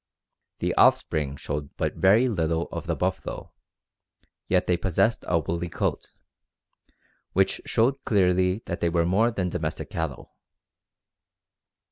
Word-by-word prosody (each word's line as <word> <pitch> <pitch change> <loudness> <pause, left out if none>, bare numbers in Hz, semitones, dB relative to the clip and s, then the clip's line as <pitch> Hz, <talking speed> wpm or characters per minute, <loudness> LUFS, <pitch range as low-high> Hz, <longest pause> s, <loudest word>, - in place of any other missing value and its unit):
The - - -1
offspring 70 -3 +3
showed 75 0 -6
but - - -1
very 105 +7 +4
little 85 -6 0
of - - -6
the - - 0
buffalo, - - -3 1.0
yet 90 0 +2
they 90 - +2
possessed 95 +5 +1
a 90 - +2
woolly 85 +2 -2
coat, - - -2 1.2
which 95 +1 +1
showed 130 +4 +1
clearly 90 0 +2
that 85 - -4
they 85 - +1
were 85 0 +1
more 100 +7 +3
than 95 -6 -2
domestic 80 -3 -4
cattle. 80 -5 -5
90 Hz, 125 wpm, -26 LUFS, 80-95 Hz, 1.2 s, very